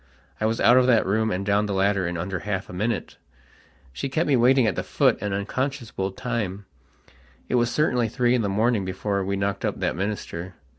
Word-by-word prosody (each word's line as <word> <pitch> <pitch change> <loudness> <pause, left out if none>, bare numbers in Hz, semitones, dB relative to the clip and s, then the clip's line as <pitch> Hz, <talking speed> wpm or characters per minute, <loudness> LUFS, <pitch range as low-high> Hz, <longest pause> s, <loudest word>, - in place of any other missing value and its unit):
I 110 - +1
was 115 +1 -1
out 120 +5 +6
of 130 0 +4
that 115 -4 +4
room 110 +3 +1
and 100 -1 -2
down 105 +1 +2
the 100 - -2
ladder 100 -1 +1
in 85 0 -3
under 90 +2 -3
half 100 -2 -3
a - - -10
minute. 110 +4 -2 0.8
She 135 - -4
kept 155 +5 0
me 140 - +4
waiting 125 +1 +4
at 110 - +1
the - - -1
foot - - +1
an 105 0 -2
unconscionable 110 0 -3
timeit 105 -4 -3 0.9
was 120 -1 +2
certainly 125 -3 +1
three 120 +1 +1
in 125 - +2
the 100 - -1
morning 110 +1 +1
before 95 +1 -2
we 100 +1 -1
knocked 100 0 -2
up - - -2
that - - -1
minister. 95 -2 -4
105 Hz, 205 wpm, -24 LUFS, 95-120 Hz, 0.9 s, out